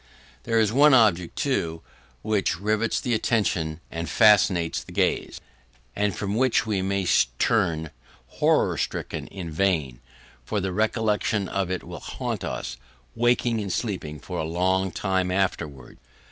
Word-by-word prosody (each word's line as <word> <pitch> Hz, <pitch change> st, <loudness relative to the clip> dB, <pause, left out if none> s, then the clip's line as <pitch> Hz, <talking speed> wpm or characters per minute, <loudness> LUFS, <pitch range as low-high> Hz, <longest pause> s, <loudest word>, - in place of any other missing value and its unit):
There 115 Hz, -1 st, +2 dB
is 110 Hz, -1 st, +2 dB
one 145 Hz, +1 st, +6 dB
object, 90 Hz, -8 st, +3 dB
too, 85 Hz, -, -1 dB, 0.4 s
which 100 Hz, -5 st, 0 dB
rivets 110 Hz, +2 st, 0 dB
the 120 Hz, -, -1 dB
attention 90 Hz, -8 st, 0 dB
and 85 Hz, -1 st, -4 dB
fascinates 90 Hz, -3 st, +4 dB
the -, -, -13 dB
gaze, -, -, 0 dB, 0.6 s
and 105 Hz, -3 st, 0 dB
from 100 Hz, -1 st, -3 dB
which 125 Hz, -1 st, +2 dB
we 105 Hz, -3 st, -1 dB
may 95 Hz, 0 st, -1 dB, 0.3 s
turn 85 Hz, -, +1 dB, 0.3 s
horror -, -, +1 dB
stricken -, -, -3 dB
in 90 Hz, -4 st, -7 dB
vain, 80 Hz, -8 st, 0 dB, 0.4 s
for 105 Hz, -, -2 dB
the 95 Hz, -1 st, -2 dB
recollection 105 Hz, -1 st, 0 dB
of 95 Hz, -1 st, -2 dB
it 95 Hz, -1 st, -3 dB
will -, -, -8 dB
haunt -, -, -4 dB
us, -, -, -4 dB, 0.4 s
waking 120 Hz, -1 st, +1 dB
and 100 Hz, -2 st, -4 dB
sleeping, 85 Hz, -9 st, -3 dB
for -, -, -6 dB
a -, -, -1 dB
long 95 Hz, +4 st, 0 dB
time 95 Hz, 0 st, -1 dB
afterwards. 85 Hz, -9 st, -2 dB
95 Hz, 145 wpm, -25 LUFS, 85-110 Hz, 0.6 s, one